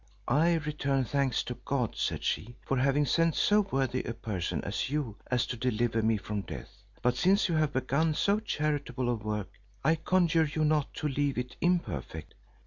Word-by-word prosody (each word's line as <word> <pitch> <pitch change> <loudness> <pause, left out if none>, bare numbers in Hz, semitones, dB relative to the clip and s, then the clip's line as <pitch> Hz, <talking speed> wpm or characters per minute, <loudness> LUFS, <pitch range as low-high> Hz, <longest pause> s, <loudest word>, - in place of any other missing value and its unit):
"I 160 +7 +4
return 145 -3 0
thanks 135 0 +1
to 125 - -4
God," 130 -5 -1
said - - -2
she 120 +3 -2
"for 135 - 0
having 140 +3 +2
sent 165 +2 +2
so 210 0 +4
worthy 135 - -1
a 115 - -4
person 90 -8 -3
as 105 +5 -2
you 140 -7 -2
are 125 - +2
to 120 0 -1
deliver 115 -1 0
me 110 0 +2
from 105 0 -3
death; 100 +1 -9 0.2
but 125 +1 +3
since 190 - +3
you 170 - -1
have 155 -2 +1
begun 140 +4 +1
so 200 +5 +2
charitable 145 - -1
a - - +2
work, 105 -2 -3 0.3
I 155 +4 +4
conjure 165 -1 +2
you 155 0 +1
not 150 -2 +1
to 150 - -2
leave 140 -1 0
it 125 0 -3
imperfect. 80 - -1
135 Hz, 185 wpm, -30 LUFS, 120-155 Hz, 0.3 s, I